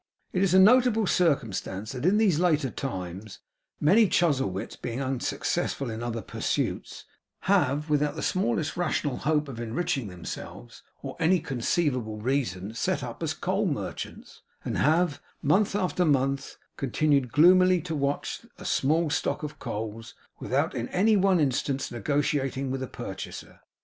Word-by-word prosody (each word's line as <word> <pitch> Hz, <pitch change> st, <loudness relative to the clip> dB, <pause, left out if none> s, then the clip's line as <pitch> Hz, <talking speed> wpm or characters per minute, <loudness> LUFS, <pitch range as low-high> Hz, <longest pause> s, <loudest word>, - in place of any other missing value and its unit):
It 185 Hz, -, +1 dB
is 190 Hz, -2 st, +3 dB
a -, -, +8 dB
notable 225 Hz, +1 st, +5 dB
circumstance 110 Hz, -, 0 dB
that 130 Hz, +5 st, -2 dB
in 200 Hz, +3 st, +4 dB
these 200 Hz, -8 st, +3 dB
later 155 Hz, -7 st, +2 dB
times, 95 Hz, -4 st, -6 dB, 0.4 s
many 205 Hz, +9 st, +5 dB
Chuzzlewits, 135 Hz, -, 0 dB
being 120 Hz, +2 st, -5 dB
unsuccessful 135 Hz, -1 st, -2 dB
in 110 Hz, +1 st, -5 dB
other 115 Hz, -2 st, -3 dB
pursuits, -, -, -3 dB, 0.4 s
have, 150 Hz, -6 st, +2 dB
without 150 Hz, 0 st, +1 dB
the 155 Hz, -, -4 dB
smallest 155 Hz, -3 st, 0 dB
rational 155 Hz, -5 st, -1 dB
hope 150 Hz, 0 st, 0 dB
of 125 Hz, -4 st, -7 dB
enriching 120 Hz, +1 st, -2 dB
themselves, 90 Hz, -8 st, -8 dB, 0.2 s
or -, -, -6 dB
any 175 Hz, +3 st, +3 dB
conceivable 125 Hz, -4 st, -1 dB
reason, 110 Hz, -5 st, -2 dB
set 115 Hz, -, -1 dB
up -, -, -7 dB
as -, -, -1 dB
coal -, -, 0 dB
merchants; -, -, -5 dB, 0.2 s
and -, -, -2 dB
have, 160 Hz, 0 st, +2 dB, 0.2 s
month 190 Hz, +8 st, +3 dB
after 185 Hz, -2 st, +1 dB
month, 135 Hz, -3 st, 0 dB, 0.2 s
continued 135 Hz, -1 st, +1 dB
gloomily 185 Hz, +5 st, +6 dB
to 165 Hz, 0 st, -5 dB
watch 140 Hz, -1 st, -2 dB
a -, -, -11 dB
small 155 Hz, +3 st, +1 dB
stock 160 Hz, -, -1 dB
of 150 Hz, 0 st, -6 dB
coals, 110 Hz, +1 st, -6 dB, 0.2 s
without 140 Hz, +6 st, 0 dB
in 120 Hz, -2 st, -3 dB
any 215 Hz, +4 st, +3 dB
one 190 Hz, -2 st, +3 dB
instance 135 Hz, -1 st, 0 dB
negotiating 135 Hz, +2 st, -1 dB
with 135 Hz, 0 st, -3 dB
a 130 Hz, -, -3 dB
purchaser. 95 Hz, -7 st, -8 dB
140 Hz, 145 wpm, -27 LUFS, 120-175 Hz, 0.4 s, a